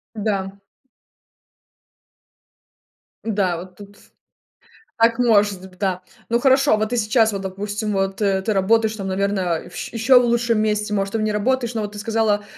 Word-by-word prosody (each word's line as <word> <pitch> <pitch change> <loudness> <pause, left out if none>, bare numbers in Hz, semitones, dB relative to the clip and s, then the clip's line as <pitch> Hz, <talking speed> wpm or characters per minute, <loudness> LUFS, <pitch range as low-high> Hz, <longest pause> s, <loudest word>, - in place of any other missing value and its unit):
Да. 200 -2 -2 2.7
Да, 200 -5 0
вот 180 +2 -10
тут. 205 0 -13 1.0
Так 230 +1 +3
может 205 -5 +3
б 185 - -21
да. 185 -2 -1 0.3
Ну 235 - +2
хорошо, 270 -3 +4
вот 215 0 -1
ты 245 - -2
сейчас, 220 0 +2
вот, 195 -1 -5
допустим, 205 +3 -4
вот, 195 +1 -1
э, 195 -2 +2
ты 210 +2 -1
работаешь, 220 +3 +2
там, 195 -2 -5
наверное, 190 -3 -1
вщ 175 - -7
ещё 245 +3 +5
в 245 - +1
лучшем 235 -1 +1
месте, 210 -1 0
может, 195 -1 -1
там 225 - -1
не 215 0 0
работаешь, 235 +3 0
но 220 - -1
вот 205 0 -5
ты 210 - -9
сказала, 220 -1 0
210 Hz, 160 wpm, -21 LUFS, 195-225 Hz, 2.7 s, ещё